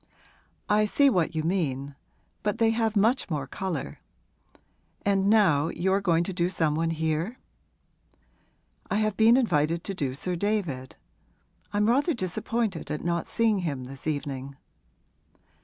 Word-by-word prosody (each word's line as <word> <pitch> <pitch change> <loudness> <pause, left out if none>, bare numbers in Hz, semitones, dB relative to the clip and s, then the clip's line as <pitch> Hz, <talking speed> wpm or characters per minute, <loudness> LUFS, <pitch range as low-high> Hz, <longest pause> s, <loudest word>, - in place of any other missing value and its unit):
'I 210 +1 +3
see 280 +6 +4
what 170 -6 0
you 155 - 0
mean. 145 -6 -1 0.5
But 210 +1 -1
they 225 -1 +3
have 225 -1 0
much 225 +5 +2
more 150 -4 -2
colour. 160 - -4 1.1
And 200 -1 +2
now 180 -9 +4
you 190 +3 0
are 200 - +2
going 170 -3 +2
to 190 - -4
do 175 0 0
some 160 -5 +1
one 165 +2 0
here?' 160 +7 -1 1.5
'I - - 0
have 215 -1 +1
been 225 +2 +6
invited 165 - +1
to 195 - -4
do 135 -8 -2
Sir 180 +6 -3
David. 170 -10 -2 0.8
I'm 205 0 +1
rather 280 +7 +2
disappointed 215 -1 -2
at 150 - -3
not 170 -1 -1
seeing 225 -3 +1
him 145 -8 -3
this 135 +3 -9
evening.' 140 -2 -4
180 Hz, 145 wpm, -27 LUFS, 155-215 Hz, 1.5 s, been